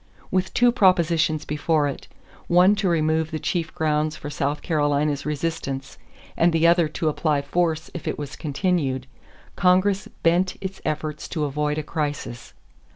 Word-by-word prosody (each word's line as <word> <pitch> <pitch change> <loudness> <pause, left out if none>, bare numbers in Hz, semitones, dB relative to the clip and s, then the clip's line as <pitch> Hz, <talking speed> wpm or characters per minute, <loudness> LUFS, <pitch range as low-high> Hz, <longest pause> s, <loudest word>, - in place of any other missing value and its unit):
With 185 0 0
two 245 0 +5
propositions 170 - +2
before 150 0 +1
it, 140 - -6 0.4
one 180 +3 +5
to 195 - +1
remove 160 -1 +1
the 155 - -3
chief 170 +1 -2
grounds 155 0 0
for 145 -1 -7
South 145 +1 -2
Carolina's 145 -2 0
resistance 140 -3 -3 0.4
and 170 +1 +3
the 165 0 +2
other 170 -1 +5
to 155 +1 -3
apply 150 -1 +1
force 160 +1 -1
if 175 - -7
it - - -2
was 145 0 -6
continued, 145 -4 -1 0.5
Congress 190 +1 +3 0.2
bent 180 +2 +2
its 190 0 -6
efforts 155 0 -3
to 155 -3 -2
avoid 150 +1 -1
a 155 - -2
crisis. 145 -6 -4
155 Hz, 155 wpm, -23 LUFS, 150-175 Hz, 0.5 s, two